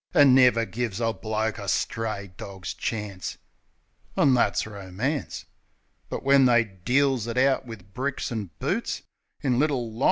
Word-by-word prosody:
An' 145 -5 +7
never 125 -3 +5
give 115 -3 -3
a 115 -1 +1
bloke 110 0 -2
a 100 - -6
stray 100 -1 -2
dog's 95 -1 -7
chance, 105 -5 -4 0.8
An' 135 - +5
that's 125 - +2
Romance. 105 +8 -4 0.6
But - - -4
when 140 -1 +6
they 120 -1 +5
deals 125 +5 0
it 115 +1 -4
out 130 0 +3
wiv 100 -4 -11
bricks 130 +2 -2
an' 110 -5 -3
boots - - -2 0.4
In 125 -3 +1
Little 135 -6 0
Lon. 115 - -10
115 Hz, 150 wpm, -26 LUFS, 105-130 Hz, 0.8 s, An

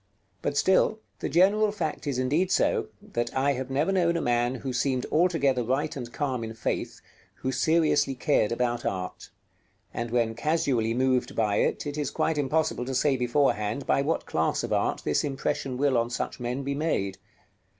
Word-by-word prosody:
But - - -2
still, 190 +5 +3 0.2
the - - -3
general 205 +5 +4
fact 160 -8 -4
is 140 -3 -1
indeed 150 +9 +1
so, - - +2 0.3
that 120 0 -1
I 140 +2 +3
have 130 0 -4
never 145 +7 +1
known 170 -3 +2
a - - 0
man 120 0 +1
who 130 +1 -4
seemed 130 0 0
altogether 155 -6 +2
right 135 +6 -1
and 120 -3 -6
calm 130 -4 -2
in 110 0 -6
faith, 115 - -3 0.3
who 130 - -3
seriously 155 -2 +2
cared 125 -5 +1
about 120 0 -1
art; 90 -1 -4 0.6
and 115 0 -3
when 115 -1 +1
casually 120 -4 0
moved 130 -1 +1
by 105 -2 +1
it, - - 0
it 145 +1 -4
is 145 - -1
quite 160 -2 0
impossible 150 -2 0
to 130 +1 -3
say 140 +1 +3
beforehand 125 -2 0
by - - +2
what 155 +4 -1
class 80 0 0
of - - -2
art - - 0
this 75 - +1
impression 135 -2 -2
will 140 -1 +2
on 115 0 -1
such 120 - -4
men 125 +3 -3
be 140 +1 -2
made. 140 -11 -1
130 Hz, 180 wpm, -27 LUFS, 120-150 Hz, 0.6 s, general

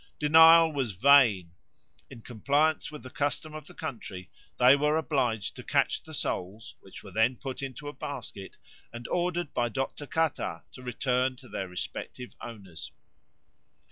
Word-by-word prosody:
Denial 160 +1 +7
was 130 -7 -2
vain; 110 -6 +5 0.6
in 120 -4 -12
compliance 140 +6 0
with 150 - -10
the 130 - -10
custom 145 +2 -2
of 155 -1 -9
the - - -14
country 100 - -7 0.3
they 125 +2 +7
were 150 +2 +1
obliged 130 - -1
to - - -9
catch - - +1
the - - -13
souls, 100 +5 -4
which 95 - -13
were 100 - -11
then 110 +6 +2
put 130 +1 -6
into 135 +2 -7
a 145 - -5
basket 120 -10 -7 0.3
and 120 0 -8
ordered 175 -2 -1
by 120 0 0
Dr. 135 +4 -4
Catat 155 - -1
to - - -12
return 125 +1 0
to 125 0 -15
their 95 - -5
respective 90 +7 -7
owners. 90 -10 -9
130 Hz, 155 wpm, -28 LUFS, 110-150 Hz, 0.6 s, Denial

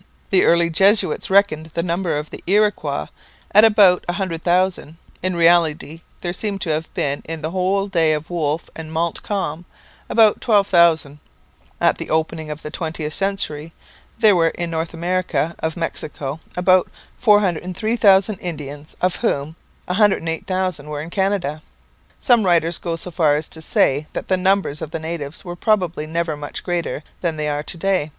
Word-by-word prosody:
The 190 - +4
early 170 0 +3
Jesuits 195 +6 +3
reckoned 190 -5 +3
the 170 - 0
numbers 170 -3 -1
of 150 - -14
the - - -9
Iroquois 210 +2 +1 0.5
at 210 - +7
about 205 -5 +5
a 175 - -1
hundred 175 -4 -3
thousand; 175 -3 +1 0.2
in 185 0 -1
reality 165 -2 +2 0.2
there 175 -1 -3
seem 200 +1 -3
to 175 -4 -2
have 155 +1 -2
been, 140 0 -1
in 165 -1 -6
the 190 +4 0
days 160 -4 +3
of 155 +3 -10
Wolfe 160 -2 -1
and 160 -1 -8
Montcalm, 170 0 -2 0.4
about 220 -2 +4
twelve 210 -4 +3
thousand. 165 -6 +3 0.6
At - - +2
the - - -6
opening 160 0 -1
of 150 +1 -7
the 150 - -6
twentieth 155 -2 -4
century 165 -5 -2 0.4
there 215 -4 +5
were 165 -2 +3
in 170 0 -3
America 170 0 -1
north 165 +4 -2
of 160 +1 -3
Mexico 150 -3 -4 0.2
about 185 0 +3 0.3
403,000 205 0 +3
Indians, 150 -3 -7
of 180 0 +1
whom 155 -8 -1 0.3
108,000 185 -4 0
were 150 -1 -4
in 165 - -9
Canada. 190 -7 -1 0.6
Some 240 -4 +4
writers 170 -2 +2
go 170 -2 -3
so 180 +2 -4
far 155 -3 +3
as 150 +1 -3
to 160 - -7
say 150 -1 +1
that - - -5
the 190 - +4
numbers 185 -5 +1
of 160 - -5
the 160 - -4
natives 160 0 -5
were 175 -1 -6
probably 175 -6 0
never 165 -1 -2
much 145 0 -7
greater 170 -4 -2 0.2
than 165 -3 -2
they 150 0 -2
are 145 0 -1
to 165 - -6
day. 185 -3 0
170 Hz, 165 wpm, -20 LUFS, 155-190 Hz, 0.6 s, at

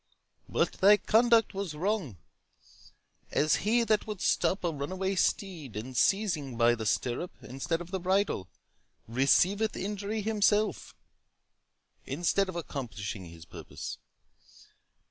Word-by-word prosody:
But - - +1
thy 205 +2 +8
conduct 230 +1 +3
was 195 -5 -4
wrong; 180 - -2 1.1
as 155 +1 +2
he 230 +5 +2
that 215 -1 +1
would 210 -3 -5
stop 190 +1 +1
a 170 - +1
runaway 185 +7 -2
steed, 175 - -1
and 125 +5 -6
seizing 155 - +1
by 120 0 +5
the 110 -2 -3
stirrup 125 - -1
instead 135 +6 -3
of 175 +1 -9
the 190 - -2
bridle, 185 - 0 0.6
receiveth 180 - +2
injury 205 +2 -3
himself, 210 0 +1 1.1
instead 190 +3 0
of 185 - -6
accomplishing 115 - -5
his 85 -1 -12
purpose. - - -8
185 Hz, 120 wpm, -29 LUFS, 135-205 Hz, 1.1 s, thy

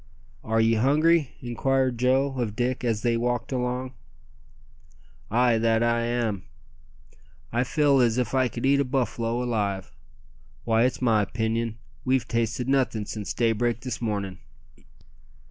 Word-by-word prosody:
"Are 110 0 0
ye 115 0 +4
hungry?" 150 +5 +3
inquired 130 0 0
Joe 135 +2 +2
of 110 -4 -2
Dick 125 +2 -1
as 115 -3 -1
they 120 -1 +2
walked 120 +1 -1
along. 125 0 -2 1.4
"Ay, 120 0 +3
that 115 0 +2
am 115 -3 0 1.1
I. 120 - +1
I - - +4
feel 140 +1 +2
as 120 -1 +2
if 125 -2 -1
I 130 -1 +3
could 120 +2 -5
eat 140 +1 +4
a - - +3
buffalo 120 -2 -1
alive. 100 -9 -2 0.7
Why, 115 +1 +3
it's 130 0 -1
my 110 -4 +3
'pinion 115 +1 -2 0.3
we've 130 -2 +1
tasted 115 +1 -1
nothin' 130 -6 +1
since 105 -1 -5
daybreak 115 0 0
this 125 -2 -5
mornin'." 100 -5 -3
120 Hz, 140 wpm, -25 LUFS, 115-130 Hz, 1.4 s, ye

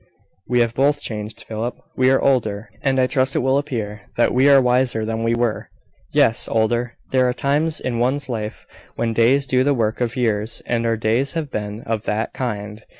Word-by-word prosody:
"We 125 -1 +3
are - - +1
both 140 +5 +1
changed, 105 -4 -5
Philip. 115 +2 -4 0.2
We 130 0 +3
are 135 - +4
older, 110 -5 0
and 135 -1 +1
I 130 - +4
trust 130 0 +1
it - - +1
will 135 +1 +3
appear 110 -8 -4 0.2
that 120 - +3
we 130 +3 +4
are 140 -1 +7
wiser 125 -3 +1
than 110 0 -3
we 115 +1 +1
were. 120 -2 -1 0.4
Yes, 115 - +3
older. 120 +2 0 0.2
There 130 -1 +3
are - - 0
times 150 +5 0
in 120 -2 -3
one's 135 +4 +1
life 110 -4 -5 0.3
when 115 -1 -1
days 125 +5 +3
do 130 -1 +2
the 140 +1 +2
work 115 0 -1
of 120 -1 -1
years 110 -3 -1
and 115 -1 0
our 115 0 +1
days 115 +5 0
have 160 -4 -3
been 105 +1 -4
of 110 -1 -3
that 110 +2 -2
kind. 105 -4 -4
120 Hz, 205 wpm, -21 LUFS, 110-130 Hz, 0.4 s, are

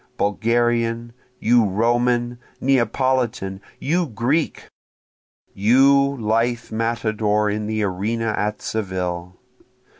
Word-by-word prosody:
Bulgarian! 115 +2 0 0.3
You 120 +1 +4
Roman! 120 +4 +1 0.2
Neapolitan! 125 -5 0 0.2
you 170 +4 0
Greek! 125 +7 -1 0.9
You 140 +6 +4
lithe 115 +2 0
matador 110 -2 0
in 105 0 -3
the 110 0 -1
arena 110 +4 -1
at 105 +1 -2
Seville! 90 -4 -3
115 Hz, 85 wpm, -21 LUFS, 105-120 Hz, 0.9 s, You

